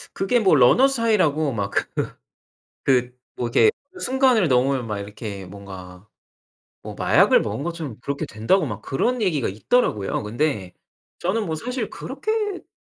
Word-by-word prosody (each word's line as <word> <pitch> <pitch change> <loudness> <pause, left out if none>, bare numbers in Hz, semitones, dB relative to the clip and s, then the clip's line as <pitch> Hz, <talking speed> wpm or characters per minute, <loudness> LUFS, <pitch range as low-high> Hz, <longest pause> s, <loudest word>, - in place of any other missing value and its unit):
그게 215 +5 +1
뭐 195 -6 +4
Runner's 255 - +5
High라고 160 -10 +2
막 100 -3 -2
그 - - 0 1.0
그 125 -2 +1 0.2
뭐 120 - -2
이렇게 270 - +4 0.3
순간을 255 - +3
넘으면 130 0 +2
막 105 -2 -3
이렇게 100 -1 -7
뭔가 95 -1 -11 0.8
뭐 - - -8
마약을 - - +4
먹은 110 +7 -3
것처럼 165 -9 -5
그렇게 140 +3 -3
된다고 150 - +1
막 105 -4 -6
그런 240 - -1
얘기가 160 - 0
있더라고요. 105 - 0
근데 110 -4 -2 0.5
저는 210 +5 -1
뭐 160 -2 -2
사실 245 +3 -4
그렇게까진 415 +8 -4
140 Hz, 340 characters per minute, -23 LUFS, -, 1.0 s, Runner's